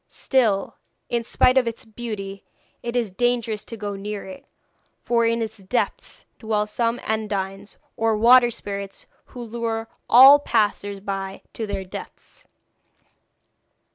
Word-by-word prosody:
Still, 225 -7 0 0.3
in 235 -1 0
spite 255 +3 +4
of 250 - -2
its 230 0 -5
beauty, 210 -3 -6 0.4
it 240 0 -5
is 235 -5 0
dangerous 235 0 0
to 230 - -8
go 205 -1 -4
near 205 +1 -5
it, 190 -1 -11 0.6
for 235 -1 +2
in 230 0 +1
its 220 0 -6
depths 245 - -3
dwell 215 -2 0
some 230 +2 -1
Undines, 200 -2 -3 0.2
or 225 -1 +1
water 240 +2 +6
spirits, 200 -3 -6 0.2
who 245 - -9
lure 225 -1 -3 0.2
all 270 +4 +9
passers 205 -5 0
by 195 -1 -5
to 220 - -4
their 195 -2 -4
deaths.' 185 - -11
220 Hz, 135 wpm, -23 LUFS, 200-235 Hz, 0.6 s, all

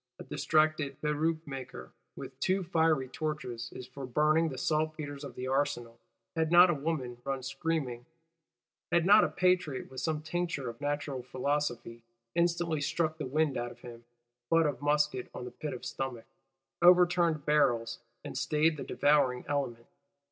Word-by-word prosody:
A - - -8
distracted 155 -2 +1
"Peruke 155 +2 0
maker 135 -3 -8 0.2
with - - -9
two 190 +1 +1
fiery 160 -5 +2
torches" 125 -5 -4
is 125 - -8
for 130 +1 -8
burning 155 +5 +3
"the 130 - -7
saltpetres 155 -1 -2
of 140 - -8
the 125 - -5
Arsenal;"—had 135 +4 -3
not 175 +1 +8
a - - +1
woman 140 -5 -3
run 135 -1 -3
screaming; 135 -3 -3 0.8
had 170 -1 +3
not 205 +3 +7
a - - +1
Patriot, 180 -8 0
with 130 -1 -6
some 155 +1 -1
tincture 155 -4 -2
of 115 - -19
Natural 145 -2 -2
Philosophy, 125 -2 -2 0.3
instantly 170 -2 +1
struck 160 +2 -1
the 150 - -3
wind 150 0 +1
out 120 - -2
of 120 0 -15
him 120 -1 -11 0.5
(butt 165 0 +4
of 145 -2 -2
musket 145 -3 +1
on 125 0 -6
pit 150 - -5
of 125 - -7
stomach), 130 -4 -4 0.6
overturned 175 -3 +5
barrels, 120 -6 +2 0.2
and - - -7
stayed 155 +1 +1
the - - -5
devouring 145 -4 +2
element. 130 -5 -2
145 Hz, 155 wpm, -31 LUFS, 130-160 Hz, 0.8 s, not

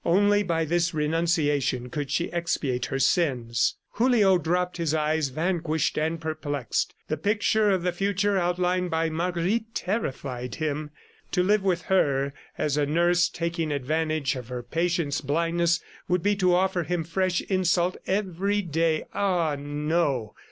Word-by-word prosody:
Only 205 +3 +4
by 165 -4 0
this 170 +1 0
renunciation 150 -5 0
could 145 0 -3
she 170 +5 -1
expiate 150 -7 -1
her 135 - -2
sins. 130 -6 +1 0.2
Julio 220 -6 +4
dropped 180 +3 -1
his 165 -2 0
eyes, 155 -1 +1
vanquished 160 +1 -1
and 160 +2 -1
perplexed. 145 -5 -2
The 155 - -1
picture 210 +4 +2
of 190 -3 +1
the 180 - +1
future 200 +2 0
outlined 180 0 +1
by 160 0 0
Marguerite 180 +7 -1
terrified 135 - -3
him. 150 -1 -2 0.4
To 180 - +3
live 205 +2 +3
with 180 -3 0
her 140 -7 +1 0.2
as 150 -1 0
a 145 -1 +2
nurse 175 +3 +3
taking 170 -2 -2
advantage 155 0 0
of 125 -3 -7
her 125 -1 -5
patient's 165 +1 -1
blindness 170 +4 +1 0.3
would 180 -1 +1
be 205 0 +3
to 180 -2 +3
offer 185 0 +1
him 170 +1 -2
fresh 180 +2 0
insult 185 -1 +1
every 200 +1 0
day.... 165 -1 0
Ah, 175 -6 +1
no! 145 -4 -1
170 Hz, 145 wpm, -26 LUFS, 150-180 Hz, 0.4 s, Only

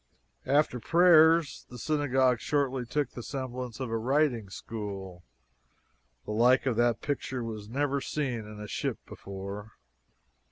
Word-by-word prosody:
After 140 -2 +2
prayers 165 +1 +5
the 125 - -9
Synagogue 130 -3 +2
shortly 135 -4 -1
took 145 +1 -1
the 120 - -7
semblance 130 -2 -5
of 130 -4 -4
a 115 - 0
writing 125 -4 +1
school. 95 -4 -7 1.0
The - - -5
like 120 +5 +4
of 130 -3 +1
that 120 -1 +2
picture 130 -3 -3
was 110 -2 -6
never 140 +2 0
seen 135 -5 -2
in 105 0 -10
a 105 - -7
ship - - -2
before. 100 +2 -8
125 Hz, 135 wpm, -29 LUFS, 110-140 Hz, 1.0 s, prayers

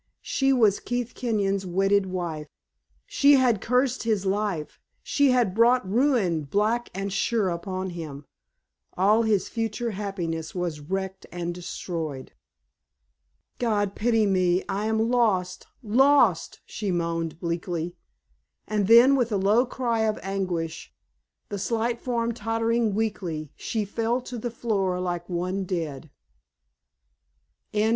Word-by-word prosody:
she 270 0 +1
was 220 -6 +4
Keith 245 -1 -3
Kenyon's 200 -5 -1
wedded 195 +2 +2
wife. 170 -5 -4 0.6
She 285 0 +4
had 250 -6 +3
cursed 250 +1 +1
his 215 -4 0
life; 195 -5 -2 0.2
she 285 -1 +2
had 245 -7 +2
brought 235 +1 +4
ruin 205 - +2
black 215 +10 0
and 195 0 -3
sure 205 0 +1
upon 185 +2 -4
him; 150 -4 -7 0.7
all 205 +5 +4
his 215 -4 +1
future 225 +1 -2
happiness 180 -6 -4
was 175 -4 -2
wrecked 190 +5 -4
and 175 0 -3
destroyed. 165 -5 -5 1.3
"God 205 -4 0
pity 225 0 +2
me, 185 -2 +2
I 205 +2 -2
am 220 +1 +1
lost 190 -7 +1 0.2
lost!" 240 - +3
she 205 -2 -4
moaned, 165 -2 -2
bleakly. 170 0 -3 0.7
And 210 -2 0
then 235 +5 +8
with 245 -4 +1
a 205 - +1
low 210 +6 +3
cry 240 -3 -1
of 220 -1 +1
anguish, 180 -4 -3 0.6
the 205 - -4
slight 230 +3 -1
form 235 -2 -1
tottering 225 -1 0
weakly, 180 -9 -3
she 220 -2 -2
fell 230 +4 -1
to 245 -1 -7
the 240 - -3
floor 200 -6 -1
like 175 -1 -3
one 185 +2 -2
dead. 160 -6 -4
200 Hz, 125 wpm, -25 LUFS, 180-230 Hz, 1.3 s, then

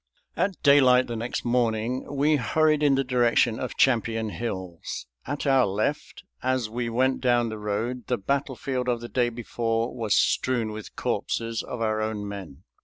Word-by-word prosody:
At 185 +1 -1
daylight 130 -3 +6
the 120 - -5
next 115 +2 -3
morning 120 0 0
we 145 +2 +2
hurried 155 +5 +2
in 145 -2 +4
the 135 - +1
direction 120 -2 +2
of 130 - -5
Champion 115 -3 +2
Hills. 95 -7 -5 0.2
At 145 +3 -3
our 135 -4 +4
left, 100 +3 -2 0.2
as 130 -4 0
we 120 0 -2
went 130 +3 +1
down 120 -2 +2
the 110 -1 -6
road, 110 +4 -3
the 125 - 0
battlefield 130 +1 -2
of 120 -1 0
the 120 0 -8
day 120 -2 +1
before 115 0 -2
was 110 -4 +1
strewn 120 -4 +1
with 105 0 -9
corpses 115 -1 -2
of 120 - -6
our 110 -1 0
own 110 -1 -3
men. 95 -7 -8
120 Hz, 170 wpm, -26 LUFS, 110-130 Hz, 0.2 s, daylight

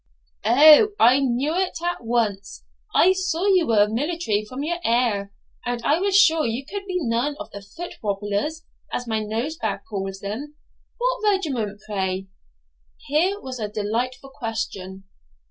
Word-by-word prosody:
'O, 300 - +7
I 250 +4 +6
knew 270 +3 0
it 370 0 -1
at 350 -6 -2
once; 210 - -1 0.3
I 370 +2 +6
saw 370 -1 -1
you 370 -5 +4
were 210 -2 +4
military 235 -2 -1
from 255 +6 -6
your 345 +3 -2
air, 225 -4 +1 0.3
and 245 -1 -2
I 300 +7 +3
was 390 +1 +3
sure 325 -5 +5
you 235 +4 -2
could 395 +5 -6
be 370 - -4
none 245 +3 0
of - - -8
the 200 - -8
foot 265 - -8
wobblers, 205 +10 -2 0.3
as 245 - -3
my 220 -2 -1
Nosebag 220 +2 -3
calls 195 -2 -4
them. 245 +10 -6 0.4
What 475 -4 +1
regiment, 235 - -3
pray?' 190 -2 -2 0.8
Here 355 +8 +1
was 260 -6 -7
a 215 - -2
delightful 240 +6 -3
question. 200 -7 -5
245 Hz, 150 wpm, -23 LUFS, 210-320 Hz, 0.8 s, O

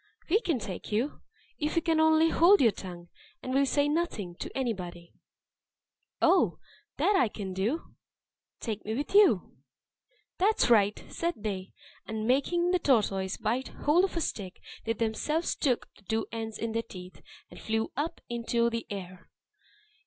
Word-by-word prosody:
"We 420 +5 +4
can 330 - 0
take 195 -4 -6
you, 235 +8 -1 0.4
if 300 0 -1
you 335 - +3
can 325 -1 +2
only 315 +1 +5
hold 370 +5 +6
your 230 -4 +5
tongue, 175 -3 -9 0.3
and 255 - -3
will 275 +1 +3
say 285 +1 +2
nothing 295 - -1
to - - -5
anybody." 180 -9 -4 1.1
"Oh! - - +4 0.4
that 410 - +3
I 255 - +4
can 200 -3 -6
do. 215 - -2 0.7
Take 215 -3 -4
me 220 +1 -3
with 290 +8 -3
you." 390 - +4 0.8
"That's 395 - +3
right," 205 -2 +3
said 340 0 -2
they. 195 -3 -5 0.3
And 220 -1 -3
making 345 +8 +2
the 365 - +3
tortoise 200 - +1
bite 245 +5 -1
hold 320 +5 +2
of 380 -3 -1
a - - 0
stick, 195 -10 -4 0.3
they 225 - +1
themselves 230 +9 -1
took 255 -5 0
the - - -22
two 220 +2 -1
ends 225 -1 -4
in 230 0 -3
their 230 +1 0
teeth, 180 -6 -11 0.3
and - - -11
flew 220 0 -1
up 315 +5 -3
into 235 0 0
the 230 -1 -4
air. 185 -2 -8
230 Hz, 160 wpm, -29 LUFS, 205-310 Hz, 1.1 s, hold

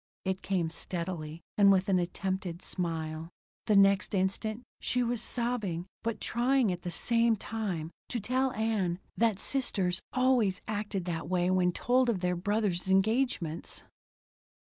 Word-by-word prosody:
It 190 0 -1
came 180 -4 0
steadily, 170 -2 -4 0.2
and 200 -1 +8
with 190 -1 +3
an 190 -2 +3
attempted 180 0 -3
smile. 160 -2 -3 0.4
The 210 - +4
next 195 +1 +5
instant 215 +5 -1 0.2
she 250 0 +1
was 240 -1 -1
sobbing, 220 -9 -1 0.2
but 230 -1 -2
trying 245 -1 +2
at 175 -1 -4
the 175 - -4
same 230 +6 +2
time 195 -7 -3 0.2
to 240 - -1
tell 255 +5 +1
Ann 210 -5 0 0.2
that 225 -3 +2
sisters 195 -8 -1
always 250 -7 +3
acted 205 -3 -2
that 165 -2 -3
way 180 0 +2
when 180 -1 +3
told 250 +6 +2
of 200 -6 0
their 180 -1 +1
brothers' 190 -1 0
engagements. 195 -4 +1
195 Hz, 140 wpm, -30 LUFS, 180-230 Hz, 0.4 s, and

